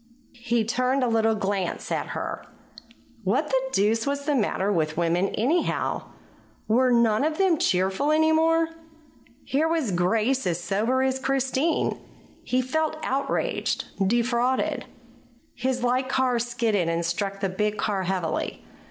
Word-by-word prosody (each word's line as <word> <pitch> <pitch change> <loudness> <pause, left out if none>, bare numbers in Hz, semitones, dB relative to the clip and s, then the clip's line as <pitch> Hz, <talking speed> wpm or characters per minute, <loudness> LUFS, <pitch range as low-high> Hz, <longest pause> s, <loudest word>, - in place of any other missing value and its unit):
He 235 -1 +1
turned 255 +3 +1
a - - +2
little 225 -1 +2
glance 195 -3 -2
at - - -1
her. - - -4 0.8
What 255 +11 +1
the 265 -1 +2
deuce 220 +3 +1
was 280 0 -2
the 295 - +1
matter 205 -5 0
with 155 -3 -1
women, 175 +2 +1
anyhow? 295 +11 0 0.6
Were 250 +3 +3
none 235 0 +3
of 310 +1 0
them 370 -5 +3
cheerful 190 +10 +1
any 315 +1 +4
more? 325 +1 +3 0.8
Here 295 +4 +1
was 320 -9 0
Grace 215 +7 +1
as 175 -1 0
sober 220 +8 0
as 265 0 0
Christine. 270 +4 0 0.4
He 255 0 0
felt 310 +4 -1
outraged, 275 +2 -1 0.2
defrauded. 240 +3 +1 0.7
His 255 0 -2
light 255 +2 +1
car 260 -2 +1
skidded 230 -7 0
and 165 0 -1
struck 195 +4 -2
the 195 - 0
big 210 +3 -1
car 205 -3 -1
heavily. 185 -3 -2
240 Hz, 140 wpm, -25 LUFS, 195-265 Hz, 0.8 s, any